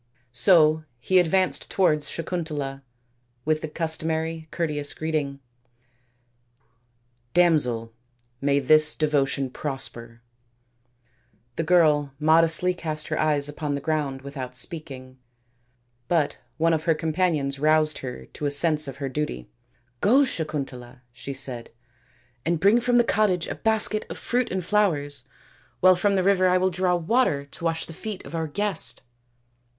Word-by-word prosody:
So 155 Hz, +4 st, +4 dB, 0.2 s
he 185 Hz, +9 st, +3 dB
advanced 185 Hz, +2 st, +1 dB
towards 150 Hz, -6 st, +1 dB
Sakuntala 150 Hz, -5 st, -4 dB, 0.6 s
with 155 Hz, 0 st, +1 dB
the -, -, -4 dB
customary 160 Hz, 0 st, -2 dB
courteous 150 Hz, -3 st, -2 dB
greeting, 150 Hz, -3 st, -3 dB, 1.3 s
" 120 Hz, +1 st, -44 dB
Damsel, 125 Hz, -10 st, +2 dB, 0.5 s
may 140 Hz, 0 st, +2 dB
this 155 Hz, +2 st, +5 dB
devotion 140 Hz, -3 st, 0 dB
prosper." 120 Hz, -5 st, -3 dB, 1.3 s
The -, -, -1 dB
girl 150 Hz, -5 st, +3 dB
modestly 165 Hz, +3 st, +4 dB
cast 155 Hz, -3 st, -3 dB
her -, -, -2 dB
eyes 150 Hz, -2 st, +1 dB
upon 145 Hz, 0 st, -3 dB
the -, -, -3 dB
ground 140 Hz, -3 st, -2 dB
without 135 Hz, -3 st, -7 dB
speaking, 130 Hz, -2 st, -5 dB, 0.9 s
but 160 Hz, -4 st, 0 dB, 0.2 s
one 165 Hz, +1 st, +2 dB
of 160 Hz, 0 st, -1 dB
her 165 Hz, -2 st, +3 dB
companions 155 Hz, -4 st, -1 dB
roused 155 Hz, 0 st, +3 dB
her 125 Hz, -2 st, -7 dB
to 150 Hz, -, -5 dB
a -, -, +1 dB
sense 150 Hz, +1 st, +3 dB
of 135 Hz, -, -6 dB
her 140 Hz, -1 st, -4 dB
duty. 125 Hz, -, -4 dB, 0.2 s
" 120 Hz, 0 st, -42 dB
Go, 260 Hz, +7 st, +5 dB
Sakuntala," 135 Hz, -, -5 dB
she 135 Hz, +2 st, -7 dB
said, 120 Hz, -4 st, -4 dB, 0.4 s
" 120 Hz, 0 st, -37 dB
and 170 Hz, 0 st, 0 dB
bring 205 Hz, +6 st, +4 dB
from 245 Hz, 0 st, +2 dB
the 240 Hz, -, +5 dB
cottage 200 Hz, -6 st, +1 dB
a -, -, -3 dB
basket 220 Hz, -1 st, -1 dB
of -, -, -6 dB
fruit 245 Hz, 0 st, -1 dB
and 185 Hz, -2 st, -3 dB
flowers, 145 Hz, -10 st, 0 dB, 0.5 s
while 185 Hz, 0 st, +6 dB
from 200 Hz, +3 st, +1 dB
the 190 Hz, -, +1 dB
river 185 Hz, -1 st, +3 dB
I 180 Hz, 0 st, +3 dB
will 185 Hz, +1 st, +1 dB
draw 180 Hz, 0 st, +1 dB
water 175 Hz, -, +1 dB
to 140 Hz, -, -12 dB
wash 165 Hz, 0 st, 0 dB
the 165 Hz, -, -10 dB
feet 205 Hz, +2 st, -7 dB
of -, -, -11 dB
our 160 Hz, -1 st, -2 dB
guest." 195 Hz, +3 st, -1 dB
155 Hz, 145 wpm, -24 LUFS, 140-175 Hz, 1.3 s, while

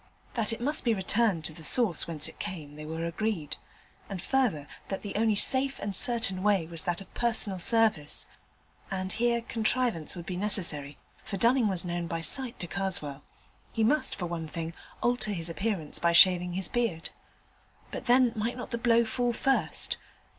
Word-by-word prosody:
That 225 Hz, -3 st, 0 dB
it 225 Hz, -, -4 dB
must 290 Hz, +5 st, +1 dB
be 230 Hz, -2 st, +2 dB
returned 195 Hz, -3 st, +1 dB
to 160 Hz, -, -1 dB
the 165 Hz, 0 st, -12 dB
source 205 Hz, -2 st, +4 dB
whence 160 Hz, -3 st, -1 dB
it -, -, -12 dB
came 150 Hz, -5 st, -6 dB
they 150 Hz, 0 st, -8 dB
were 160 Hz, +1 st, -4 dB
agreed, 170 Hz, -2 st, -3 dB, 0.5 s
and 195 Hz, -2 st, -5 dB
further, 205 Hz, -, 0 dB, 0.2 s
that 195 Hz, -, -4 dB
the 200 Hz, -2 st, -6 dB
only 220 Hz, 0 st, +2 dB
safe 265 Hz, +5 st, +2 dB
and 200 Hz, -1 st, -4 dB
certain 225 Hz, -6 st, +3 dB
way 200 Hz, -4 st, +2 dB
was 165 Hz, 0 st, -3 dB
that 175 Hz, +2 st, -1 dB
of 195 Hz, -, -14 dB
personal 220 Hz, -5 st, +1 dB
service; 210 Hz, -8 st, +2 dB, 0.6 s
and 190 Hz, -1 st, -3 dB
here 235 Hz, 0 st, +1 dB
contrivance 225 Hz, -, -1 dB
would 175 Hz, -2 st, -8 dB
be 180 Hz, -1 st, -5 dB
necessary, 170 Hz, -8 st, -1 dB, 0.3 s
for 205 Hz, -2 st, -5 dB
Dunning 235 Hz, +2 st, +3 dB
was 185 Hz, -3 st, +1 dB
known 175 Hz, -1 st, -3 dB
by 165 Hz, 0 st, -3 dB
sight 255 Hz, +7 st, +3 dB
to 175 Hz, -, -4 dB
Karswell. 170 Hz, -8 st, -1 dB, 0.5 s
He 225 Hz, -, -1 dB
must, 295 Hz, +8 st, +2 dB
for 180 Hz, -, -4 dB
one 170 Hz, -2 st, -4 dB
thing, 165 Hz, +1 st, -5 dB, 0.3 s
alter 240 Hz, -3 st, 0 dB
his 165 Hz, -2 st, -2 dB
appearance 190 Hz, -4 st, -3 dB
by 170 Hz, 0 st, +2 dB
shaving 180 Hz, 0 st, +6 dB
his 190 Hz, +1 st, -1 dB
beard. 230 Hz, -9 st, -2 dB, 0.8 s
But -, -, -7 dB
then 245 Hz, -1 st, +4 dB
might 225 Hz, +3 st, -2 dB
not 250 Hz, -, -7 dB
the 235 Hz, -, -2 dB
blow 235 Hz, -1 st, +3 dB
fall 240 Hz, +2 st, -1 dB
first? 270 Hz, +3 st, +1 dB
195 Hz, 185 wpm, -28 LUFS, 170-235 Hz, 0.8 s, shaving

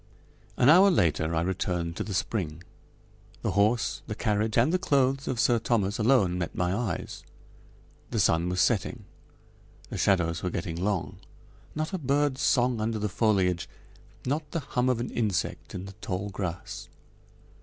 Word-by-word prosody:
An 125 Hz, -, +4 dB
hour 185 Hz, +6 st, +8 dB
later 80 Hz, -, +1 dB
I 80 Hz, -, +2 dB
returned 90 Hz, -2 st, -2 dB
to -, -, -2 dB
the 100 Hz, -, -4 dB
spring. 90 Hz, -6 st, -2 dB, 0.8 s
The -, -, 0 dB
horse, 110 Hz, +4 st, +1 dB
the 105 Hz, -, -4 dB
carriage, 105 Hz, 0 st, 0 dB
and 125 Hz, +9 st, +4 dB
the 185 Hz, -, +2 dB
clothes 135 Hz, -4 st, +1 dB
of 125 Hz, -, -2 dB
Sir 120 Hz, -1 st, +3 dB
Thomas 110 Hz, -3 st, 0 dB
alone 110 Hz, -7 st, +3 dB
met 85 Hz, -, -3 dB
my 90 Hz, +1 st, 0 dB
eyes. 105 Hz, -6 st, -4 dB, 0.9 s
The -, -, -1 dB
sun 85 Hz, +2 st, +2 dB
was 90 Hz, 0 st, -1 dB
setting. -, -, 0 dB, 0.9 s
The -, -, -4 dB
shadows 85 Hz, -4 st, +2 dB
were 90 Hz, -, -1 dB
getting 85 Hz, -1 st, -4 dB
long. 95 Hz, -5 st, -1 dB, 0.6 s
Not 155 Hz, +4 st, -3 dB
a 190 Hz, -, -1 dB
bird's 140 Hz, -1 st, +1 dB
song 125 Hz, -4 st, +2 dB
under 110 Hz, 0 st, -1 dB
the 105 Hz, 0 st, -1 dB
foliage, 95 Hz, -5 st, +1 dB, 0.6 s
not 145 Hz, +3 st, -2 dB
the 165 Hz, -, -2 dB
hum 125 Hz, -1 st, 0 dB
of 125 Hz, -2 st, +1 dB
an 120 Hz, -, -3 dB
insect 105 Hz, -6 st, -2 dB
in 90 Hz, -, -5 dB
the 100 Hz, -, -9 dB
tall 100 Hz, 0 st, -3 dB
grass. 90 Hz, -3 st, -5 dB
105 Hz, 165 wpm, -27 LUFS, 90-125 Hz, 0.9 s, hour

